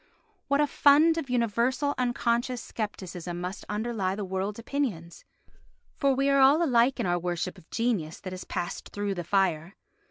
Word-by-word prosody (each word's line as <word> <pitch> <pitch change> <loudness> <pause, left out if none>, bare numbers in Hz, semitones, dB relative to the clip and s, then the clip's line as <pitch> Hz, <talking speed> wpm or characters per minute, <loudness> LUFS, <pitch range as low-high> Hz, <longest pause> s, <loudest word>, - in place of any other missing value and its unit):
What 280 +1 +2
a 295 - +5
fund 300 +3 +5
of 280 - -6
universal 245 +4 +1
unconscious 240 0 0 0.2
scepticism 180 -5 -5
must 180 +2 -5
underlie 210 -3 -1
the 205 -1 -4
world's 190 +2 -3
opinions! 230 - -4 0.7
For 275 -2 +2
we 275 +1 +1
are 275 - +4
all 280 +5 +6
alike 250 -3 +3
in - - 0
our 175 -1 +1
worship 175 -1 -3
of 160 - -22
genius 220 -10 -1
that 185 - -6
has 185 - -6
passed 175 - -5
through 205 -1 -2
the 175 -2 -4
fire. 180 -1 0
220 Hz, 165 wpm, -27 LUFS, 185-265 Hz, 0.7 s, all